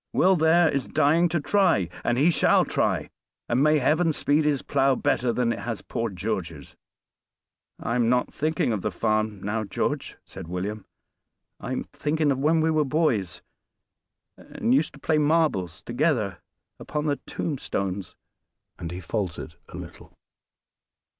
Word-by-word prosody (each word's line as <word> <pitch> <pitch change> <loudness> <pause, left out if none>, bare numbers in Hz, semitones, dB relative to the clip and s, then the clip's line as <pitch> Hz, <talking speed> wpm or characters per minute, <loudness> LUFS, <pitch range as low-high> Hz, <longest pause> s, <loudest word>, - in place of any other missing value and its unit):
Will 190 +1 +4
there 165 +1 +4
is 140 -3 -1
dying 155 +4 +3
to 170 0 0
try, 170 - +2 0.2
and 120 - +1
he 155 +6 +4
shall - - +4
try, - - 0 0.4
and 120 +2 +1
may 155 +1 +4
Heaven 155 +4 +2
speed 150 +1 +2
his 145 -3 +1
plow 135 -1 +2
better 125 -1 +1
than 115 -1 +1
it - - -6
has 115 -3 -5
poor 115 0 -3
George's." 90 -6 -5 1.0
"I 115 - -3
am 120 -1 +2
not 125 0 +1
thinking 155 -5 0
of 105 - -2
the 105 - -1
farm 110 0 -1
now, 110 +2 -1
George," 100 - -3
said 95 -3 -10
William. 95 +4 -4 0.7
"I'm - - -3
thinking 150 -1 -1
of 135 - -1
when 160 +3 +3
we 160 +1 +2
were 155 -1 +2
boys, 135 - 0 0.9
and 120 - -2
used 150 +3 +2
to 145 - -14
play 155 +1 +1
marbles 145 - +1
together 120 - 0 0.4
upon 150 0 -3
the 145 -2 +1
tombstones." 100 - -3 0.6
And 85 -2 -5
he 90 +2 -6
faltered 90 -4 -4 0.2
a - - -9
little. - - -11
130 Hz, 155 wpm, -25 LUFS, 105-155 Hz, 1.0 s, Will